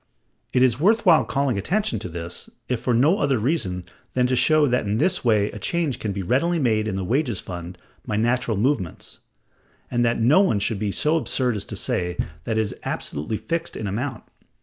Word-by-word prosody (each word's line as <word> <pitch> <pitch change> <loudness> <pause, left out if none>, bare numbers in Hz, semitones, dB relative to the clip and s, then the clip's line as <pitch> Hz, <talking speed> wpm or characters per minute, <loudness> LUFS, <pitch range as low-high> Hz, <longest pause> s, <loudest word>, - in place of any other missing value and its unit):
It 125 - +3
is 125 -1 +3
worth 220 +7 +3
while 170 -4 +6
calling 135 -6 0
attention 210 - 0
to 90 - -6
this, 85 +1 -7 0.2
if 125 -3 -1
for 120 0 0
no 150 - +4
other 140 -8 +2
reason 105 - -1 0.3
than 125 -1 +3
to 130 +1 +1
show 155 +4 +4
that 125 -4 +1
in 105 +2 0
this 180 +8 +1
way 105 -4 +2
a - - -8
change 165 -7 -1
can 105 - -2
be 100 -1 -3
readily 165 - +1
made 110 -7 +1
in 100 - -2
the 95 - -2
wages 120 - 0
fund 90 0 -7 0.3
by 105 - -3
natural 120 0 +1
movements; 110 - -2 0.7
and 120 -1 +1
that 115 0 +1
no 130 +12 +5
one 150 - +2
can 100 +1 -1
be 105 -1 -1
so 155 +10 +2
absurd 125 -6 0
as 100 - -3
to - - -7
say 90 -1 -2 0.3
that 110 -1 -1
it - - +4
is 105 - -3
absolutely 75 +9 -3
fixed 165 +6 -3
in 110 - -4
amount. 115 +5 -3
120 Hz, 210 wpm, -23 LUFS, 100-145 Hz, 0.7 s, while